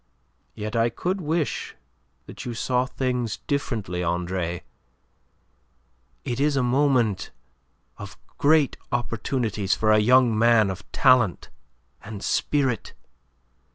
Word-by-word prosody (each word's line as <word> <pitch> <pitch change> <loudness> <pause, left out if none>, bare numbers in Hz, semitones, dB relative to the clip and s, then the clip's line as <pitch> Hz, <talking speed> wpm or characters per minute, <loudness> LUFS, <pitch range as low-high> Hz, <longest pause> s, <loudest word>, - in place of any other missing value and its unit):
Yet 105 +1 -5
I 115 +1 +3
could 180 - -3
wish 160 -1 -2 0.5
that - - -9
you 120 -1 -5
saw 125 +2 0
things 125 -5 -2
differently, 105 -11 -2
Andre. 85 0 -2 1.6
It 120 +1 -3
is 145 0 +2
a 135 - +2
moment 125 -5 +1 0.7
of - - -9 0.2
great 150 -1 +3
opportunities 115 -4 -1
for 110 0 +2
a 110 - +5
young 125 +1 +4
man 110 -2 +4
of 95 - -10
talent 125 -8 +3 0.5
and 105 -1 -8
spirit. 135 -5 0
120 Hz, 110 wpm, -24 LUFS, 105-130 Hz, 1.6 s, a